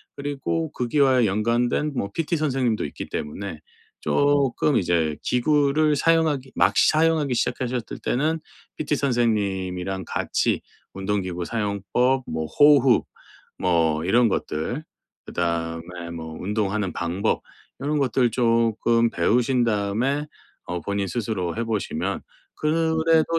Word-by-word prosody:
그리고 145 +3 -3
거기와의 130 0 +3
연관된 120 +8 0
뭐 100 - -2
PT 165 0 -1
선생님도 130 -7 0
있기 - - -7
때문에 80 +2 -5 0.4
쪼끔 140 - +2
이제 85 -4 +1
기구를 150 +3 +2
사용하기 150 -3 +2
막 - - +3
사용하기 155 -3 +3
시작하셨을 125 -1 -2
때는 155 +5 0 0.4
PT 150 -1 0
선생님이랑 95 -7 0
같이 - - 0 0.3
운동기구 95 -3 -2
사용법, 115 +6 0
뭐 80 0 -3
호흡 135 - +5 0.5
뭐 80 -3 +2
이런 115 +5 +4
것들 95 - -2 0.4
그다음에 85 0 -3
뭐 80 -1 -7
운동하는 105 -1 -1
방법 90 +5 -1 0.4
요런 150 +2 0
것들 125 -3 +2
쪼끔 115 0 +2
배우신 125 +1 +2
다음에 115 +7 0 0.4
어 90 -1 -4
본인 100 +2 -2
스스로 95 -4 -2
해 115 - 0
보시면 110 -3 -2 0.3
그래도 160 +1 +2
115 Hz, 270 characters per minute, -24 LUFS, 95-140 Hz, 0.5 s, 호흡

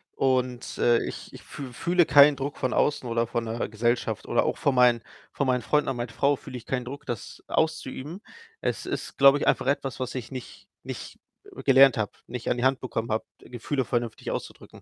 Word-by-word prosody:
Und, 130 -2 0
äh, 120 -1 +4
ich - - -7
ich - - -11
fü 135 -3 -8
fühle 175 +8 +2
keinen 145 0 +7
Druck 140 +2 -4
von 130 - -1
außen 145 -3 +1
oder 115 0 +1
von 115 0 -2
'ner 115 +1 -3
Gesellschaft 115 0 -1
oder - - +2
auch - - -1
von 140 - +1
meinen 125 -2 +5 0.3
von 140 - -1
meinen 125 -1 +2
Freunden 150 +2 +1
und 135 - -2
meiner 120 -1 -4
Frau 140 0 +2
fühle 130 - -9
ich 120 - -12
keinen 125 -2 -2
Druck, 140 +3 -8
das 120 -4 -6
auszuüben. 160 +2 -2 0.4
Es - - -2
ist, - - -5
glaube 140 +1 +7
ich, - - -2
einfach - - +2
etwas, 140 -1 -1
was 130 -1 -3
ich 125 -5 -5
nicht 130 -3 -9 0.2
nicht, - - -7 0.4
äh, - - -8
gelernt 135 -1 +6
habe, 110 -2 -1 0.2
nicht 120 0 -5
an - - +1
die 120 - 0
Hand 130 0 +2
bekommen 115 -3 -3
habe, 110 - 0 0.2
Gefühle 125 +2 -3
vernünftig 120 -1 -2
auszudrücken. - - -7
130 Hz, 210 wpm, -26 LUFS, 120-140 Hz, 0.4 s, keinen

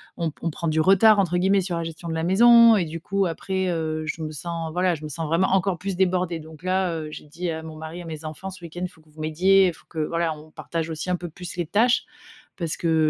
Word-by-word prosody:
on 165 -3 -2
p - - -28
on 170 - -1
prend 165 +1 -3
du 160 0 +1
retard, 195 +5 +6
entre 180 -2 +1
guillemets, 195 +2 +3
sur 180 -2 -2
la 170 - -2
gestion 165 +1 -7
de 165 - -2
la 160 0 -2
maison 230 +4 +7
et 175 - +1
du 160 +1 -6
coup, 195 +1 0
après, 190 +3 -2
heu, 155 -2 -2
je 160 - -4
me 155 0 -4
sens, 165 +1 -5
voilà, 180 0 +1
je 155 - -11
me 155 - -5
sens 160 +2 -4
vraiment 165 +4 +2
encore 190 -1 +1
plus 190 +1 -4
débordée. 180 -3 +1
Donc 160 +1 -13
là, 185 -1 +1
heu, 155 -1 -5
j'ai - - -9
dit 170 +3 -4
à 160 0 -4
mon 160 -1 -8
mari, 160 +3 -7
à - - -10
mes 160 -1 -7
enfants: 155 +5 -6
«Ce 185 -2 -12
week-end, 175 +2 -5
faut 160 -3 -20
que 155 - -26
vous 155 +1 -18
m'aidiez. 185 +5 +4
Il 175 - -1
faut - - -20
que 160 - -6
voilà, 165 +1 0
on 155 +1 -15
partage 165 -1 -4
aussi 160 +3 -4
un 180 - +1
peu 175 - -6
plus 175 +2 -9
les 175 - -1
tâches» 225 +8 +2 0.5
parce 165 -4 -3
que 160 -2 +2
170 Hz, 280 wpm, -24 LUFS, 160-185 Hz, 0.5 s, maison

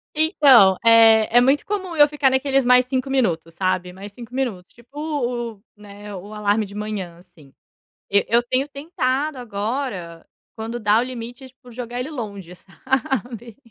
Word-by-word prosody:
Então, 275 - +5
eh, 225 -1 +6
é - - +9
muito 270 +3 +2
comum 380 -4 -4
eu 295 -2 +6
ficar 290 -3 +1
naqueles 270 0 +1
mais 250 0 +5
5 260 0 -2
minutos, 170 -11 -1
sabe. 180 0 -2
Mais 200 +2 -10
5 240 +2 -12
minutos, 220 -10 -4
tipo, 240 +5 -15
u 250 -6 -3
u 200 +2 -28
né. 205 0 -11
O 200 +3 -9
alarme 210 +1 0
de 200 - -13
manhã 205 -5 -5
assim. 170 -6 -20 0.6
E 200 0 +3
eu 235 +1 +3
tenho 255 +4 -1
tentado 280 -1 -2
agora, 205 -6 -5 0.3
quando 230 +2 -5
dá 210 +1 +3
o 235 - +2
limite 250 +1 -8
tipo, 250 -1 -19
jogar 245 +1 -6
ele 260 +5 -5
longe, 200 - -7
sabe? 240 +2 -4
235 Hz, 165 wpm, -21 LUFS, 205-265 Hz, 0.6 s, é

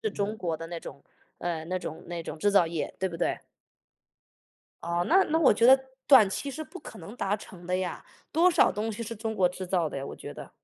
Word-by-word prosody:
对 440 -2 -1
中 205 +2 -2
国 170 -5 -2
的 165 - -7
那 170 0 -6
种 140 - -10 0.4
呃， 165 -2 -3
那 185 +2 -1
种 160 -3 -7
那 170 -1 -5
种 160 - -7
制 205 +6 +2
造 195 -4 +5
业， 165 -3 -4
对 190 - 0
不 170 - -7
对？ - - 0 1.4
哦， 170 +1 0
那 380 +3 +6
那 320 - +3
我 320 - +6
觉 230 - +3
得 265 +1 +8 0.3
短 255 -8 +8
期 275 +9 -4
是 315 +3 -5
不 365 - -10
可 225 - -11
能 190 +8 -10
达 205 -3 0
成 180 -3 -12
的 180 +1 0
呀， 185 -2 -4 0.3
多 340 +4 +4
少 335 - +4
东 220 +2 -2
西 225 +3 -5
是 230 +1 -5
中 220 +1 -3
国 185 -3 +3
制 185 +1 -7
造 175 -3 +1
的 - - -7
呀， 135 - -4
我 - - -8
觉 - - -8
得。 - - -10
190 Hz, 265 characters per minute, -28 LUFS, 170-230 Hz, 1.4 s, 得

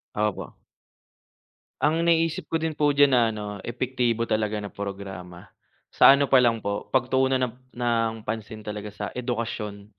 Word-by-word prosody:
Opo. 105 -1 -2 1.2
Ang 165 +3 +2
naisip 165 -1 +1
ko 165 - +1
din 160 0 -2
po 150 0 +2
diyan 145 -1 +4
na 125 - +5
ano, 105 -1 -5 0.2
epektibo 120 -1 -1
talaga 110 -1 -1
na 105 -1 -6
programa, 95 -3 -7 0.5
sa - - +7
ano 140 - +2
pa 135 -2 +5
lang 115 -2 +3
po, 100 -1 -4
pagtuunan 130 +1 +2
ng 125 -3 -1 0.2
ng 115 -2 +1
pansin 110 -1 -5
talaga 105 0 -5
sa 105 0 -6
edukasyon. 115 -4 -4
115 Hz, 150 wpm, -25 LUFS, 105-130 Hz, 1.2 s, sa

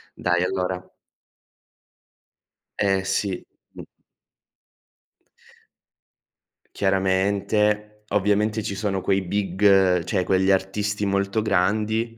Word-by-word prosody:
Dai 90 0 0
allora 90 0 -3 1.9
Eh 95 -1 +1
sì, 95 -1 -2 0.3
mh. - - -9 2.9
Chiaramente. 100 +2 0
Ovviamente, 105 +2 +1
ci 100 - -4
sono 100 -1 -2
quei 95 +1 +1
big, 95 -1 +2
cioè 95 -4 0
quegli 95 +1 +1
artisti 100 +2 -1
molto 100 +2 0
grandi 110 +3 0
100 Hz, 80 wpm, -23 LUFS, 95-105 Hz, 2.9 s, big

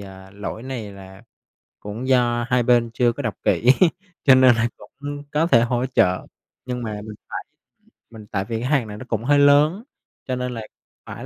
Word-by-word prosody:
ờ, 95 -1 -12
lỗi 105 +3 -7
này 120 -6 -6
là 95 -1 -13 0.6
cũng 110 +5 -6
do 120 -2 +2
hai 125 -1 +2
bên 120 -1 +3
chưa 120 0 +2
có 140 +3 -6
đọc 110 - -1
kỹ, 120 - +2 0.5
cho 135 -2 +7
nên 130 -2 +6
là 115 +1 +1
cũng 145 +1 -8
có 160 +3 +1
thể 115 -8 +5
hỗ 120 +1 0
trợ. 90 -8 +1 0.4
Nhưng 125 -1 -4
mà 105 -2 -5
mình 105 -1 -8
phải - - -5 0.7
mình 110 -2 -12
tại 95 -1 -3
vì 115 +1 -4
hàng 130 -3 +1
này 105 0 -8
nó 130 - -9
cũng 115 -1 -2
hơi 145 +2 +3
lớn 145 +8 +4 0.4
cho 130 - -1
nên 125 0 -3
là 115 - -5 0.4
phải - - -8
120 Hz, 195 wpm, -22 LUFS, 110-130 Hz, 0.7 s, cho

